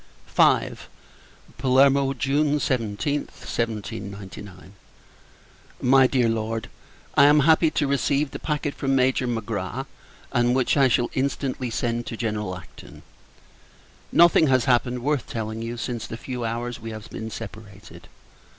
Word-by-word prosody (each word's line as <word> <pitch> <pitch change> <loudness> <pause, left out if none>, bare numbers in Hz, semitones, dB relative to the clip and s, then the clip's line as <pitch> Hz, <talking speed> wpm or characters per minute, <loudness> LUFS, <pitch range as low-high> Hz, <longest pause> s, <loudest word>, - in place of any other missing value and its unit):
V. - - +4 0.9
Palermo, 135 +1 +4
June 145 +3 +1
17th, 130 +1 -1 0.2
1799. 100 -4 -5 1.1
MY 130 +1 +5
DEAR 125 -3 +2
LORD, 115 0 -2 0.4
I 140 - +6
am 150 +1 +6
happy 160 +2 +4
to 150 -1 0
receive 140 +1 0
the - - -6
packet 150 -2 -2
from 135 -1 -1
Major 130 -1 +2
Magra, 115 -3 -3 0.5
and 120 +1 +2
which 130 -1 +2
I 135 -2 +5
shall 120 -1 +1
instantly 130 -1 -2
send 120 0 -2
to 115 - -5
General 105 -5 -3
Acton. 80 -4 -14 1.1
Nothing 170 -2 +6
has 130 -3 +3
happened, 125 -1 +1
worth 145 -2 0
telling 110 0 -4
you, 115 +1 -5
since 120 -1 -4
the 115 - -6
few 125 0 -5
hours 120 +1 -3
we 115 0 -7
have 110 0 -8
been 110 0 -6
separated. 105 -2 -10
120 Hz, 130 wpm, -24 LUFS, 110-135 Hz, 1.1 s, I